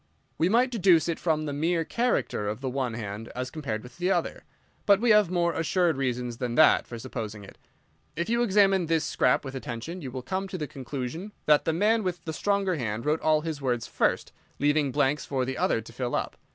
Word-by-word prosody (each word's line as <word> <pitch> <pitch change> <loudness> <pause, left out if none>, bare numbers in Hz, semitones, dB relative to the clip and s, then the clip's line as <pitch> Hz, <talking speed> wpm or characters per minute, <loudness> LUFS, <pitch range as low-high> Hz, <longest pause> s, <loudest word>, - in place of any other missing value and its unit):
"We 170 - +3
might 245 +4 +3
deduce 180 - +4
it 170 - -2
from 155 -2 0
the 145 - -3
mere 165 +3 0
character 235 - 0
of 105 - -4
the 130 -1 -3
one 125 -3 -2
hand 110 0 -6
as 125 0 -4
compared 140 -9 -4
with 125 +8 -14
the 180 +1 +1
other. - - -1 0.4
But 200 -1 +6
we 235 +1 +3
have 210 -4 +5
more 170 -2 +1
assured 170 0 +1
reasons 125 -3 -2
than 120 -1 -3
that 155 - +5
for 120 - -7
supposing 110 -4 -6
it. 100 - -14 0.6
If 170 +2 -2
you 235 +1 +1
examine 195 -5 +3
this 165 -1 +1
scrap - - +1
with 135 - -6
attention 130 +7 -6
you 135 - -5
will 130 0 -6
come 190 +7 -3
to 185 - -5
the 155 - -3
conclusion 140 - -6
that 150 -1 +4
the 160 - +1
man 215 +6 +2
with 180 -3 -4
the 160 - -3
stronger 195 0 0
hand 115 -2 -3
wrote 155 +2 +1
all 155 -1 +3
his 155 -2 -4
words 120 -3 -1
first, - - 0 0.3
leaving 145 -1 +2
blanks 145 +1 +1
for 130 -2 -1
the 130 +1 -3
other 115 - +1
to 115 +1 -13
fill 125 0 -2
up. - - -2
150 Hz, 220 wpm, -27 LUFS, 125-180 Hz, 0.6 s, But